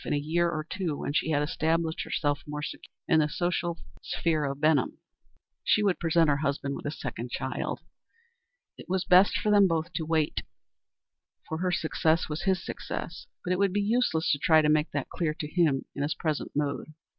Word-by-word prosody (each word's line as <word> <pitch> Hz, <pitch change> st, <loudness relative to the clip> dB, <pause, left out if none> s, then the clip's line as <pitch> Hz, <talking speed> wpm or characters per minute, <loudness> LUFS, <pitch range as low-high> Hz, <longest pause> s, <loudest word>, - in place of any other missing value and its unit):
In -, -, -2 dB
a -, -, +2 dB
year 165 Hz, +4 st, +1 dB
or 155 Hz, -2 st, -3 dB
two, 170 Hz, -7 st, -2 dB
when 145 Hz, -, -3 dB
she 160 Hz, -, +1 dB
had 145 Hz, -2 st, +2 dB
established 160 Hz, +2 st, 0 dB
herself 145 Hz, -2 st, -1 dB
more 150 Hz, 0 st, -4 dB
securely -, -, -7 dB, 0.2 s
in 160 Hz, -, +4 dB
the 150 Hz, -1 st, +2 dB
social 175 Hz, 0 st, -1 dB, 0.2 s
sphere 155 Hz, -3 st, 0 dB
of 140 Hz, 0 st, -3 dB
Benham, 155 Hz, -4 st, +2 dB, 0.7 s
she 210 Hz, -, +3 dB
would 195 Hz, -3 st, +2 dB
present 165 Hz, -1 st, +3 dB
her 145 Hz, -1 st, +3 dB
husband 140 Hz, -1 st, -1 dB
with -, -, -6 dB
a -, -, -1 dB
second 120 Hz, -4 st, -5 dB
child. 130 Hz, +2 st, -3 dB, 1.0 s
It -, -, -11 dB
was 185 Hz, 0 st, +1 dB
best 185 Hz, +2 st, +6 dB
for 210 Hz, -, 0 dB
them 200 Hz, -2 st, +6 dB
both 165 Hz, 0 st, -1 dB
to 160 Hz, -, -2 dB
wait, 155 Hz, -1 st, 0 dB, 1.1 s
for 160 Hz, -, -3 dB
her 180 Hz, 0 st, 0 dB
success 160 Hz, -1 st, +1 dB
was 155 Hz, +3 st, -4 dB
his 190 Hz, -2 st, +1 dB
success; 165 Hz, -1 st, -6 dB, 0.2 s
but 180 Hz, -, +1 dB
it 180 Hz, -, -1 dB
would 200 Hz, -2 st, +2 dB
be 205 Hz, -, +1 dB
useless 205 Hz, -6 st, +1 dB
to 145 Hz, -, +1 dB
try 155 Hz, +1 st, +5 dB
to 150 Hz, -, +3 dB
make 155 Hz, +1 st, +3 dB
that 145 Hz, -2 st, -3 dB
clear 155 Hz, -3 st, -1 dB
to 155 Hz, -3 st, -5 dB
him 155 Hz, -5 st, +1 dB
in 140 Hz, -, -5 dB
his 145 Hz, +2 st, 0 dB
present 155 Hz, -3 st, -2 dB
mood. 150 Hz, +1 st, -2 dB
160 Hz, 205 wpm, -28 LUFS, 150-175 Hz, 1.1 s, best